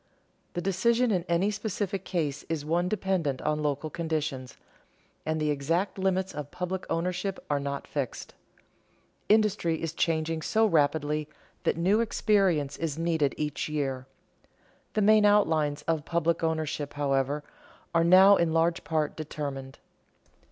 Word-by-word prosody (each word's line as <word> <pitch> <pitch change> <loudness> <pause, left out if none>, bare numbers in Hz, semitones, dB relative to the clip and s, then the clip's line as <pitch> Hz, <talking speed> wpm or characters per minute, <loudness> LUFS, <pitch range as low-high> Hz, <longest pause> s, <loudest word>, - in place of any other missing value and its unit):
The 175 - -2
decision 230 +6 +2
in 180 -4 0
any 175 +5 +2
specific 200 -2 -3
case 155 -7 -2
is 155 -3 -2
one 175 +3 +1
dependent 185 -9 -1
on 150 0 0
local 150 +1 -2
conditions, 155 -6 -3 0.7
and 160 0 0
the 150 -1 +1
exact 165 +8 -1
limits 190 0 0
of 150 -1 -6
public 180 +2 -4
ownership 180 +3 -1
are 145 - +2
not 140 0 -4
fixed. 140 -4 -4 1.0
Industry 205 -7 +2
is 165 -1 -3
changing 160 -1 0
so 220 +8 +2
rapidly 150 -3 +1 0.4
that - - +1
new 190 +6 +3
experience 195 -10 +1
is 160 -3 -3
needed 165 -4 +1
each 150 0 -2
year. 135 -4 -2 0.9
The 215 - +1
main 215 +1 +6
outlines 160 -8 +3
of 160 -2 -1
public 170 +1 0
ownership, 155 -3 -2
however, 140 0 0 0.5
are 165 0 +4
now 190 +3 +7
in 170 -1 +1
large 165 +1 +1
part 155 -2 -1
determined. 140 -3 -6
165 Hz, 135 wpm, -28 LUFS, 150-190 Hz, 1.0 s, now